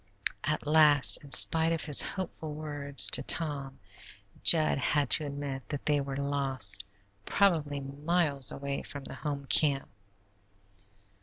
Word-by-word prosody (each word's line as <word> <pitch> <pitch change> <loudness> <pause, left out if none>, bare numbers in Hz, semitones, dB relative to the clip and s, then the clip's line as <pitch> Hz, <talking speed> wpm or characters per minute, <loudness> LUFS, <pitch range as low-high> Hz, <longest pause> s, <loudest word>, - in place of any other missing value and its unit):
At 150 +1 -3
last, 145 -8 +4
in 145 - -14
spite 160 +5 +4
of 165 -2 -4
his 150 -3 +3
hopeful 160 -5 -7
words 145 -2 +2
to - - +3
Tom, 140 -4 -2 0.6
Jud 70 -2 +4
had 145 -2 -2
to 150 - +5
admit 140 -2 -8
that 145 -2 -7
they 145 -1 0
were 135 -1 -7
lost, 135 -8 +1 0.4
probably 155 - -1
miles 145 0 -2
away 140 0 -6
from 145 -1 -10
the - - -8
home 140 -2 -7
camp. 140 -1 +2
145 Hz, 135 wpm, -28 LUFS, 135-155 Hz, 0.6 s, to